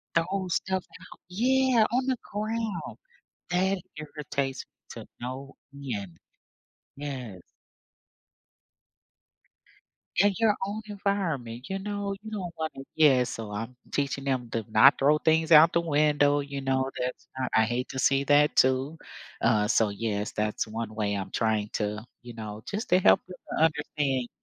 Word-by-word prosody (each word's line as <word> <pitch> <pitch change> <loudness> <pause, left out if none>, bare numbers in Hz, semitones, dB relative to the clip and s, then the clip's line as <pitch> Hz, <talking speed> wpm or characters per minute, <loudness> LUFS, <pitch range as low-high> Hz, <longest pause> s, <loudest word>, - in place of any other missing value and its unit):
The 165 - +4
whole 185 +1 -3
stuff 190 +1 -1
out. - - -15
Yeah, 250 +2 +3
on 255 +2 +1
the 260 -2 0
ground. 215 -3 -3 0.5
That 190 +2 +2 0.2
irritates 140 -3 -4 0.3
to - - -8 0.2
no 130 +3 -6 0.2
end. 105 -11 -5 0.8
Yeah. 130 -8 -6 2.8
In 205 +1 +5
your 220 -2 +4
own 205 +2 -4
environment, 165 - -2
you 195 0 -3
know, 205 0 -3
you 220 - -8
don't 185 -5 -5
wanna 155 -4 -5
yeah, 135 -5 +5
so 110 -3 -6
I'm 115 +4 -5 0.2
teaching 140 -1 -1
them 130 -3 -1
to 115 -2 -2
not 135 +7 +7
throw 150 +2 +3
things 160 +1 +2
out 160 +1 +8
the 170 - +3
window, 145 -2 +3
you 140 -1 -4
know, 135 0 0
that's 125 0 -4
not 130 -1 -2
I 110 - +5
hate 120 +3 -2
to 130 - -6
see 135 +1 +3
that 145 +1 +4
too. 130 +4 +2 0.4
Uh, 105 -2 +3
so 110 -1 +3
yes, 105 0 -2
that's 105 0 -2
one 110 0 -5
way 105 -2 -1
I'm 95 -1 -4
trying 110 -2 0
to, 105 +1 -2 0.2
you 120 -1 -9
know, 110 -1 -7
just 210 +4 -3
to 180 - +5
help - - +5
them 185 - -10 0.2
to 160 - +5
understand 145 -4 0
140 Hz, 150 wpm, -27 LUFS, 120-180 Hz, 2.8 s, out